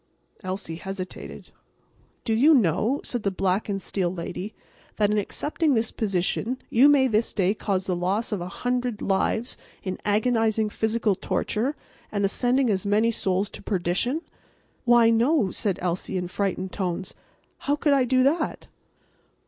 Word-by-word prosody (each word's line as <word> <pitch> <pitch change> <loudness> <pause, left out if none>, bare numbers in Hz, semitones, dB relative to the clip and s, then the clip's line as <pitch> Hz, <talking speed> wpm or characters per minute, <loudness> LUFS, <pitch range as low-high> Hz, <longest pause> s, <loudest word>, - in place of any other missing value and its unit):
Elsie 185 -3 -4
hesitated. 190 0 -7 0.7
"Do 225 - 0
you 290 +8 +6
know," 225 - +2
said 245 - -2
the 200 - +1
black 190 +2 -1
and 195 -1 -1
steel 185 -2 -1
lady, 185 +3 -6 0.4
"that 210 -1 +2
in 210 - +2
accepting 295 +7 0
this 225 0 0
position 205 +4 -1
you 260 +5 +6
may 280 -2 +5
this 225 -1 +1
day 195 -1 +2
cause 195 -3 -2
the 185 - -1
loss 190 +7 -1
of 205 -4 -2
a 175 - -4
hundred 245 +2 -2
lives 210 +4 0 0.2
in 185 -1 -4
agonizing 220 0 +2
physical 220 -1 +1
torture 235 +8 -1 0.4
and 205 -1 -1
the - - +2
sending 250 +5 +2
as 195 -4 +1
many 215 +3 +2
souls 195 -2 0
to - - -9
perdition?" 200 - -1 0.6
"Why, 240 -1 +6
no," 230 - +3
said 195 0 -1
Elsie, 180 +2 -2
in 180 -1 -2
frightened 190 -1 -2
tones. 185 -1 -3 0.5
"How 285 - 0
could 295 0 +2
I 275 -2 +4
do 255 +1 +3
that?" 310 +4 0
210 Hz, 155 wpm, -25 LUFS, 190-245 Hz, 0.7 s, you